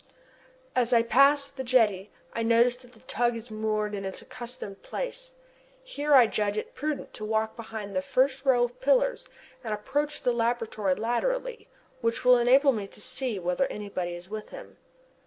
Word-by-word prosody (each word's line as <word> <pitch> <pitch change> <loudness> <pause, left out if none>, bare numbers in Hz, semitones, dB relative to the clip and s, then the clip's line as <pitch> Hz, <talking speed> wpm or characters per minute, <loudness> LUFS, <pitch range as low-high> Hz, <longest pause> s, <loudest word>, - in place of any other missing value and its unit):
As 250 -1 +2
I 230 -1 +5
pass 275 +4 +4
the 265 -1 -6
jetty 215 -6 +2 0.2
I 230 - -2
notice 235 +2 +4
that 250 -1 -18
the 220 - -19
tug 240 +1 0
is 230 0 -9
moored 215 -1 -1
in 200 -1 -4
its 190 0 -5
accustomed 245 -5 -8
place. - - -6 0.5
Here 295 - +1
I 250 -3 +8
judge 210 -1 -1
it - - -4
prudent 300 0 -4
to 215 - -8
walk 220 0 -1
behind 220 -3 -7
the 185 - +1
first 260 +6 +1
row 255 -3 +4
of 245 - -4
pillars - - +2 0.3
and 220 -2 -2
approach 290 +8 -2
the 245 - +2
laboratory 230 -4 0
laterally 480 - -2 0.3
which 230 0 -1
will 250 -1 +7
enable 265 +4 +5
me 210 -5 -4
to - - -11
see 240 +1 -2
whether 180 +8 0
anybody 190 -4 -4
is 175 +1 -10
with 215 +1 -7
him. - - -11
235 Hz, 175 wpm, -27 LUFS, 215-265 Hz, 0.5 s, I